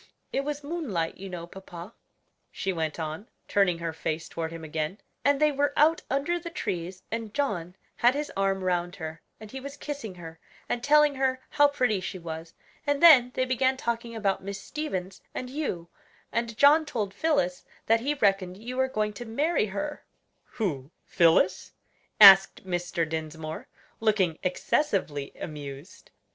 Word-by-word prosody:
It 275 - 0
was 290 0 -4
moonlight, 275 - -3
you 195 +1 -8
know, 175 -2 -6
papa," 180 +2 -10 0.6
she 195 - -2
went 160 -2 -3
on, 160 +7 -5 0.2
turning 195 -4 +2
her 165 -1 -4
face 160 0 -3
toward 165 -1 -4
him 165 -1 -8
again: 155 +3 -3 0.3
"and 285 -1 +3
they 305 0 +4
were 285 0 0
out 320 +4 +4
under 290 +6 0
the 340 0 -7
trees 185 - -4
and 225 -2 -4
John 185 -12 -1 0.2
had 245 +3 +4
his 295 +1 -3
arm 195 -1 0
round 175 0 0
her, 160 -2 -7 0.2
and 215 -1 -11
he 265 - -6
was 280 +2 -8
kissing 280 -10 -6
her, 165 -2 -10 0.3
and 240 - -2
telling 300 +1 +5
her 265 -1 0
how 290 - +5
pretty 250 -8 0
she 185 +1 -5
was; 165 -1 -7 0.3
and 285 +2 +1
then 270 -8 +9
they 255 - +1
began 260 +1 +1
talking 235 -1 -3
about 200 -3 0
Miss 200 +1 -5
Stevens 195 -9 -5
and 250 0 -5
you, 260 - -3 0.4
and 235 -1 -2
John 295 +3 +6
told 215 -10 -3
Phillis 280 - 0 0.2
that 225 +1 +4
he 285 +5 -1
reckoned 195 -6 +1
you 245 +4 -7
were 260 0 +3
going 215 -4 -1
to 240 +4 -8
marry 280 +2 +1
her 295 +10 -4 0.2
" - - -47
"Who? 150 - -2 0.2
Phillis?" 180 +2 +3 0.5
asked 195 -2 +9
Mr. 175 -2 -1
Dinsmore, 160 0 -5 0.3
looking 200 -7 +1
excessively 180 - 0
amused. 145 +1 -8
200 Hz, 165 wpm, -27 LUFS, 175-270 Hz, 0.6 s, then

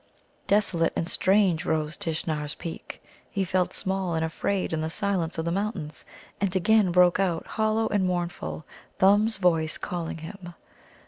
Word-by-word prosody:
Desolate 190 -5 +3
and 165 - -1
strange 185 -4 +3
rose 155 -2 -1
Tishnar's 155 -2 -3
peak. 165 - -8 0.3
He 195 - -1
felt 185 -1 0
small 190 -3 -2
and 160 0 0
afraid 185 +3 -2
in 160 - -1
the 160 - -2
silence 180 -2 -1
of 160 - -2
the 170 - 0
mountains. 190 -5 -3 0.4
And 195 -2 0
again 195 +1 +4
broke 180 +1 +5
out, 175 -4 0
hollow 220 0 0
and 205 -2 +1
mournful, 175 -3 -3 0.3
Thumb's 205 +3 +4
voice 165 -4 +2
calling 170 -2 -4
him. 175 +2 -9
180 Hz, 150 wpm, -26 LUFS, 160-195 Hz, 0.4 s, broke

